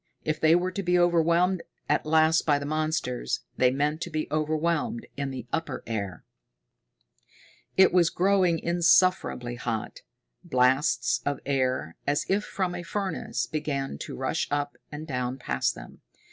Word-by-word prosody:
If 155 Hz, 0 st, -2 dB
they 160 Hz, +1 st, +6 dB
were 180 Hz, +1 st, +1 dB
to 200 Hz, -, -3 dB
be 180 Hz, -1 st, +2 dB
overwhelmed 175 Hz, +1 st, +3 dB, 0.3 s
at -, -, +1 dB
last 160 Hz, +1 st, +4 dB
by 145 Hz, -2 st, +3 dB
the 140 Hz, -, -5 dB
monsters, 155 Hz, -4 st, -1 dB, 0.2 s
they 125 Hz, -, +5 dB
meant 145 Hz, +4 st, -1 dB
to 175 Hz, -, -3 dB
be 155 Hz, -1 st, -2 dB
overwhelmed 165 Hz, +10 st, 0 dB
in 140 Hz, -1 st, -3 dB
the 130 Hz, -3 st, -6 dB
upper 165 Hz, 0 st, -2 dB
air. 100 Hz, -7 st, -4 dB, 1.5 s
It 190 Hz, -1 st, +6 dB
was 175 Hz, -2 st, +5 dB
growing 185 Hz, -1 st, +2 dB
insufferably 170 Hz, -7 st, +2 dB
hot. 115 Hz, -3 st, -4 dB, 0.4 s
Blasts 125 Hz, 0 st, +2 dB
of 145 Hz, 0 st, -2 dB
air, 130 Hz, -, -1 dB
as 145 Hz, +1 st, +1 dB
if 200 Hz, +2 st, +1 dB
from 185 Hz, -3 st, -2 dB
a 175 Hz, -, -4 dB
furnace, 195 Hz, +2 st, -3 dB
began 140 Hz, -, -3 dB
to -, -, -6 dB
rush -, -, -1 dB
up 145 Hz, 0 st, -2 dB, 0.2 s
and 150 Hz, +1 st, -6 dB
down 125 Hz, -3 st, -3 dB
past 125 Hz, -, -1 dB
them. -, -, -12 dB
155 Hz, 150 wpm, -27 LUFS, 135-175 Hz, 1.5 s, they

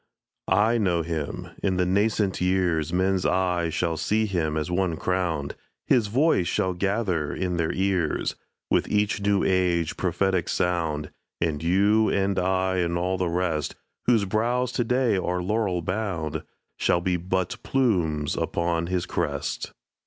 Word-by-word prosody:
I 105 Hz, +6 st, +3 dB
know 90 Hz, -5 st, +1 dB
him. 80 Hz, -3 st, -4 dB
In 95 Hz, -2 st, 0 dB
the 90 Hz, -, +2 dB
nascent 100 Hz, 0 st, +1 dB
years 90 Hz, -4 st, +1 dB
Men's 95 Hz, +1 st, +1 dB
eyes 90 Hz, -2 st, +1 dB
shall 85 Hz, -2 st, 0 dB
see 110 Hz, +5 st, +1 dB
him 80 Hz, -6 st, -1 dB
as 80 Hz, +3 st, -2 dB
one 90 Hz, -2 st, +1 dB
crowned; 85 Hz, -6 st, -1 dB, 0.3 s
His 115 Hz, -4 st, +3 dB
voice 120 Hz, -, +2 dB
shall 95 Hz, -3 st, 0 dB
gather 95 Hz, -5 st, -1 dB
in 90 Hz, -2 st, -2 dB
their 85 Hz, -2 st, 0 dB
ears 95 Hz, -4 st, 0 dB, 0.4 s
With -, -, +2 dB
each 105 Hz, 0 st, +1 dB
new 100 Hz, -1 st, +2 dB
age 90 Hz, -3 st, +1 dB
prophetic 95 Hz, 0 st, 0 dB
sound; 80 Hz, -4 st, -1 dB, 0.3 s
And 80 Hz, -3 st, -1 dB
you 100 Hz, +6 st, +3 dB
and 100 Hz, 0 st, +1 dB
I 95 Hz, 0 st, +1 dB
and 85 Hz, -1 st, 0 dB
all 90 Hz, +1 st, -1 dB
the 90 Hz, -2 st, 0 dB
rest, 85 Hz, -3 st, -1 dB, 0.3 s
Whose 115 Hz, -4 st, +4 dB
brows 120 Hz, +5 st, 0 dB
to 120 Hz, -, 0 dB
day 125 Hz, -3 st, +2 dB
are 90 Hz, -1 st, -1 dB
laurel 95 Hz, -3 st, 0 dB
bound, 90 Hz, -6 st, -2 dB, 0.4 s
Shall 85 Hz, -, +2 dB
be 90 Hz, +1 st, 0 dB
but 90 Hz, +1 st, -2 dB
plumes 85 Hz, -, +1 dB
upon 85 Hz, -1 st, -1 dB
his 90 Hz, -1 st, -1 dB
crest. 75 Hz, -5 st, -3 dB
90 Hz, 150 wpm, -25 LUFS, 85-100 Hz, 0.4 s, Whose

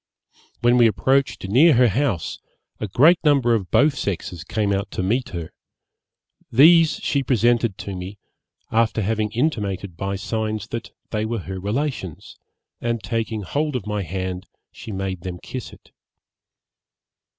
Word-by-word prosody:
When 120 Hz, +1 st, +4 dB
we 120 Hz, -1 st, +6 dB
approached 135 Hz, -1 st, +1 dB
near 140 Hz, -, +6 dB
her 125 Hz, 0 st, +5 dB
house, 110 Hz, -, -1 dB, 0.4 s
a 110 Hz, -, -3 dB
great 150 Hz, -, +5 dB
number 140 Hz, -6 st, +4 dB
of 100 Hz, -6 st, -1 dB
both 145 Hz, 0 st, +4 dB
sexes 90 Hz, -, -4 dB
came 105 Hz, 0 st, -1 dB
out 100 Hz, 0 st, -2 dB
to -, -, -3 dB
meet 120 Hz, +7 st, 0 dB
her; 85 Hz, -2 st, -6 dB, 1.0 s
these 160 Hz, +6 st, +6 dB
she 140 Hz, -, +1 dB
presented 120 Hz, -4 st, +2 dB
to 100 Hz, -, -6 dB
me, 90 Hz, +3 st, -7 dB, 0.5 s
after 115 Hz, -1 st, +2 dB
having 110 Hz, +1 st, 0 dB
intimated 105 Hz, -, -2 dB
by 100 Hz, +2 st, -3 dB
signs 110 Hz, +1 st, -3 dB
that 115 Hz, 0 st, -5 dB, 0.2 s
they 105 Hz, -1 st, -1 dB
were 110 Hz, -1 st, -2 dB
her 95 Hz, 0 st, -5 dB
relations, 105 Hz, -, -4 dB, 0.5 s
and 115 Hz, -3 st, -2 dB
taking 110 Hz, 0 st, -2 dB
hold 150 Hz, +7 st, -2 dB
of 120 Hz, -, -3 dB
my 105 Hz, -1 st, -2 dB
hand 95 Hz, +1 st, -4 dB, 0.2 s
she 110 Hz, -, -9 dB
made 95 Hz, -2 st, -4 dB
them 90 Hz, -1 st, -5 dB
kiss 125 Hz, +7 st, -7 dB
it. -, -, -18 dB
110 Hz, 150 wpm, -22 LUFS, 95-125 Hz, 1.0 s, we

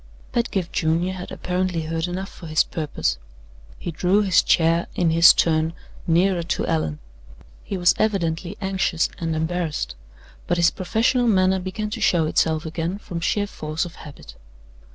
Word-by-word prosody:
Pedgift 200 Hz, -7 st, -1 dB
Junior 165 Hz, +3 st, +1 dB
had 180 Hz, -1 st, -7 dB
apparently 180 Hz, -2 st, -2 dB
heard 165 Hz, +1 st, -2 dB
enough 185 Hz, +2 st, -4 dB
for 170 Hz, -, -11 dB
his 155 Hz, 0 st, +3 dB
purpose. 145 Hz, -, -2 dB, 0.6 s
He 175 Hz, -, -5 dB
drew 185 Hz, +6 st, +2 dB
his 190 Hz, -3 st, +4 dB
chair, 165 Hz, +1 st, +2 dB
in 170 Hz, -2 st, +2 dB
his 165 Hz, +1 st, +8 dB
turn, 160 Hz, 0 st, +1 dB, 0.3 s
nearer 175 Hz, +2 st, +3 dB
to 170 Hz, -, -2 dB
Allan. 80 Hz, -2 st, -1 dB, 0.7 s
He 195 Hz, -, -4 dB
was 175 Hz, 0 st, +4 dB
evidently 185 Hz, -3 st, -1 dB
anxious 190 Hz, -4 st, 0 dB
and 165 Hz, -1 st, -2 dB
embarrassed; 160 Hz, -1 st, -2 dB, 0.5 s
but 175 Hz, -, +1 dB
his 170 Hz, 0 st, +4 dB
professional 235 Hz, +6 st, +1 dB
manner 190 Hz, -3 st, +3 dB
began 210 Hz, +3 st, -4 dB
to 225 Hz, 0 st, -5 dB
show 175 Hz, -5 st, +3 dB
itself 155 Hz, 0 st, +1 dB
again 165 Hz, +3 st, -3 dB
from 185 Hz, -5 st, -6 dB
sheer 205 Hz, +4 st, 0 dB
force 155 Hz, -5 st, -4 dB
of 170 Hz, -1 st, -10 dB
habit. 150 Hz, -3 st, -12 dB
175 Hz, 155 wpm, -23 LUFS, 160-190 Hz, 0.7 s, his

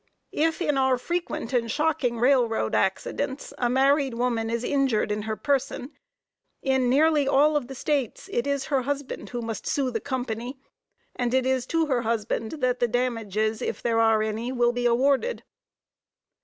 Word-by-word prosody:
If 320 Hz, +3 st, +1 dB
in 290 Hz, -5 st, +1 dB
our 265 Hz, -1 st, +3 dB
frequent 335 Hz, -4 st, -3 dB
and 235 Hz, -2 st, +1 dB
shocking 295 Hz, -3 st, 0 dB
railroad 240 Hz, -, +2 dB
accidents 265 Hz, +8 st, -1 dB
a 245 Hz, -, +1 dB
married 270 Hz, 0 st, +3 dB
woman 235 Hz, -2 st, 0 dB
is 235 Hz, +1 st, -2 dB
injured 265 Hz, -6 st, +1 dB
in 210 Hz, 0 st, -1 dB
her 220 Hz, -, -1 dB
person, 275 Hz, +1 st, -1 dB, 0.7 s
in 265 Hz, -2 st, +2 dB
nearly 295 Hz, +1 st, +3 dB
all 295 Hz, +3 st, +4 dB
of 285 Hz, -5 st, 0 dB
the 270 Hz, -, -8 dB
States, 275 Hz, -3 st, -2 dB
it 240 Hz, -, 0 dB
is 280 Hz, -1 st, -1 dB
her 275 Hz, -3 st, +1 dB
husband 285 Hz, +1 st, -4 dB
who 240 Hz, -1 st, -4 dB
must 225 Hz, -2 st, -5 dB
sue 270 Hz, -3 st, 0 dB
the 225 Hz, -2 st, -3 dB
company, 250 Hz, -1 st, -4 dB, 0.6 s
and 245 Hz, 0 st, 0 dB
it 260 Hz, -1 st, +2 dB
is 260 Hz, -1 st, 0 dB
to 330 Hz, -1 st, +1 dB
her 260 Hz, -5 st, 0 dB
husband 225 Hz, -1 st, -2 dB
that 255 Hz, -5 st, 0 dB
the 240 Hz, -, +2 dB
damages, 220 Hz, -3 st, -1 dB
if -, -, -3 dB
there 230 Hz, -1 st, +2 dB
are 225 Hz, -1 st, +4 dB
any, 220 Hz, +3 st, -3 dB
will 240 Hz, -2 st, +2 dB
be 245 Hz, 0 st, 0 dB
awarded. 275 Hz, -, +1 dB
250 Hz, 170 wpm, -25 LUFS, 230-280 Hz, 0.7 s, all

